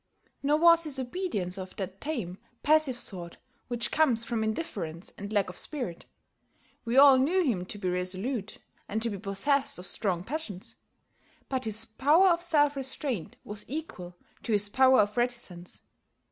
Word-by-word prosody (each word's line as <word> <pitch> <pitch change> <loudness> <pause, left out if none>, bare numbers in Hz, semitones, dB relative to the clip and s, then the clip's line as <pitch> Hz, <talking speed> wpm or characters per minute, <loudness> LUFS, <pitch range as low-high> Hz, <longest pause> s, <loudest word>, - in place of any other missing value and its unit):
Nor 290 +2 +2
was 335 0 +5
his 290 -3 -2
obedience 245 - -3
of 185 0 -8
that 190 0 -6
tame, 220 - -4 0.2
passive 300 -4 +3
sort 175 -7 0 0.3
which 240 -1 -1
comes 260 -8 +2
from 230 -1 -2
indifference 195 - -4
and 200 +1 -8
lack 205 -2 +1
of 180 - -4
spirit. 245 - -3 0.8
We 235 +2 -1
all 275 -1 +8
knew 350 +8 +2
him 195 - -1
to 205 - -6
be 195 -2 -4
resolute, 190 +5 -1 0.3
and 215 - -1
to 230 - -1
be 200 - -5
possessed 245 +8 +1
of 180 - -8
strong 180 -5 -1
passions. 235 - -6 0.7
But 260 -2 +1
his 220 +1 +1
power 295 - +4
of 340 -1 +2
self 295 -4 +3
restraint 265 - -3
was 210 0 -5
equal 215 - -7 0.3
to 230 - -2
his 205 0 +2
power 260 +1 +5
of 210 +2 -2
reticence. 235 -8 -3
235 Hz, 160 wpm, -28 LUFS, 195-280 Hz, 0.8 s, all